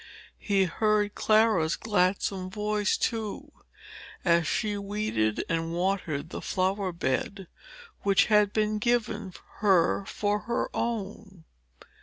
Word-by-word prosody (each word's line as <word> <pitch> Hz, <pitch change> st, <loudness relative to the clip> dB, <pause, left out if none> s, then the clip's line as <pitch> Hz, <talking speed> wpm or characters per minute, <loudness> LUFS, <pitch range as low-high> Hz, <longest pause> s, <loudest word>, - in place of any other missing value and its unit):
He 200 Hz, -2 st, +2 dB
heard 210 Hz, +3 st, +1 dB
Clara's 215 Hz, -7 st, +3 dB
gladsome 190 Hz, -2 st, 0 dB
voice, 210 Hz, +1 st, 0 dB
too, 230 Hz, +6 st, -3 dB, 0.7 s
as 170 Hz, -3 st, +3 dB
she 210 Hz, +3 st, -1 dB
weeded 200 Hz, -, -1 dB
and 165 Hz, 0 st, -2 dB
watered 170 Hz, -4 st, -2 dB
the -, -, -5 dB
flower 190 Hz, 0 st, -1 dB
bed 175 Hz, +4 st, -2 dB, 0.6 s
which 195 Hz, -1 st, +4 dB
had 210 Hz, -2 st, +3 dB
been 215 Hz, 0 st, 0 dB
given 220 Hz, -3 st, 0 dB, 0.3 s
her 195 Hz, -2 st, +3 dB
for 205 Hz, 0 st, -1 dB
her 235 Hz, -, -1 dB
own. 205 Hz, -5 st, -4 dB
200 Hz, 110 wpm, -27 LUFS, 185-215 Hz, 0.7 s, which